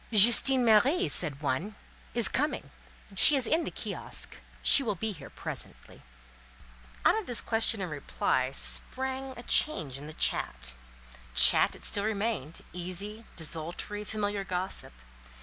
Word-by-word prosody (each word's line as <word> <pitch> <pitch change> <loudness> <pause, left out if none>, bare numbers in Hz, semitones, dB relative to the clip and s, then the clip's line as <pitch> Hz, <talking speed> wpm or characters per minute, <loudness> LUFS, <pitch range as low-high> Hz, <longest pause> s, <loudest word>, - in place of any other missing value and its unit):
"Justine 240 +4 +6
Marie," 260 - +3
said 150 -4 0
one, 165 +10 -3 0.4
"is - - +4
coming; - - -3 0.4
she 290 - +7
is 265 -3 0
in 325 +1 0
the - - -4
kiosk; - - -2 0.3
she - - +8
will 220 -6 -3
be 220 +5 -4
here 150 -8 -11
presently." - - -10 1.0
Out 440 - +3
of 430 - -10
this 245 - -1
question 225 -2 0
and 180 -4 -5
reply 130 -3 -2
sprang 265 - -2
a 240 - -10
change 150 - +1
in 145 - -11
the 155 - -8
chat—chat - - +1
it - - -14
still 200 - +2
remained, 205 - -4
easy, 190 +5 -6
desultory, 170 +6 -2
familiar 205 -1 -4
gossip. 185 - -3
200 Hz, 135 wpm, -28 LUFS, 150-230 Hz, 1.0 s, she